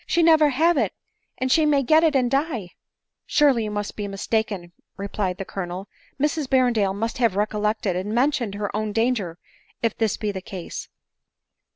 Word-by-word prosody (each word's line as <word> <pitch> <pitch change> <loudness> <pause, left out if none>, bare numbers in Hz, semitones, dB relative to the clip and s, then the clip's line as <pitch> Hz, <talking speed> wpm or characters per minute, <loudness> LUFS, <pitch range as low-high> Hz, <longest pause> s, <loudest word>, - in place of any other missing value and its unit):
she 340 - +2
never 315 -2 +6
have 320 +5 +3
it, 215 -6 0 0.4
and 260 0 -1
she 315 - +5
may 290 -2 +3
get 315 +5 +5
it 315 -3 +3
and 250 -2 +2
die 270 - -1 0.2
!" - - -62
" - - -62
Surely 275 -7 +3
you - - -3
must 205 0 -4
be 205 -1 -4
mistaken," 200 -2 -2 0.3
replied 195 -2 -2
the 195 - -5
Colonel, 185 +1 -5 0.2
" - - -33
Mrs 300 0 0
Berrendale 235 -7 +2
must 225 +3 -3
have 230 -6 +2
recollected 210 -1 0
and 190 +3 -3
mentioned 240 -3 +1
her 205 0 -3
own 215 -1 -2
danger 225 -7 0 0.5
if 230 - +1
this 220 -3 0
be 210 -1 -2
the 190 -2 -6
case." 185 -2 -7
220 Hz, 190 wpm, -23 LUFS, 200-270 Hz, 0.5 s, never